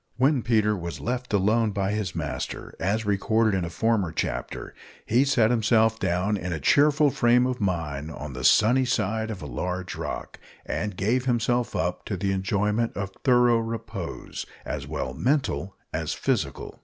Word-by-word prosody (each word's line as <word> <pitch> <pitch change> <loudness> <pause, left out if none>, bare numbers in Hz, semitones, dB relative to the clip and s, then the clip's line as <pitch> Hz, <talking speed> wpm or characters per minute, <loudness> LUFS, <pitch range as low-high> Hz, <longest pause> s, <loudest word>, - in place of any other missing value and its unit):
When 135 +1 +3
Peter 110 -2 +2
was 85 -5 -5
left 125 - -3
alone 105 +2 +2
by 100 0 0
his 105 -4 -2
master, - - -4
as 105 +4 0
recorded 110 +1 +2
in 95 - 0
a 85 - -3
former 105 -1 +1
chapter, - - -4 0.3
he 120 +5 +3
sat 120 -5 +3
himself 110 -1 +3
down 90 +4 0
in 90 -2 -4
a 80 - -2
cheerful 145 - +4
frame 120 +1 +4
of 125 -2 -2
mind 80 -6 -2
on 75 -3 -7
the 65 0 -6
sunny 110 - +5
side 110 -2 0
of 105 -4 -6
a - - -5
large 90 0 -4
rock, - - -5 0.3
and 105 -3 -3
gave 120 +6 +1
himself 120 -1 +1
up 90 +2 -1
to 100 - -3
the 95 +1 0
enjoyment 105 +4 0
of 100 -1 -3
thorough 120 -2 +5
repose, 115 -5 -5 0.2
as - - -4
well 65 - -3
mental 100 - 0 0.2
as - - -2
physical. - - -2
105 Hz, 165 wpm, -26 LUFS, 95-120 Hz, 0.3 s, sunny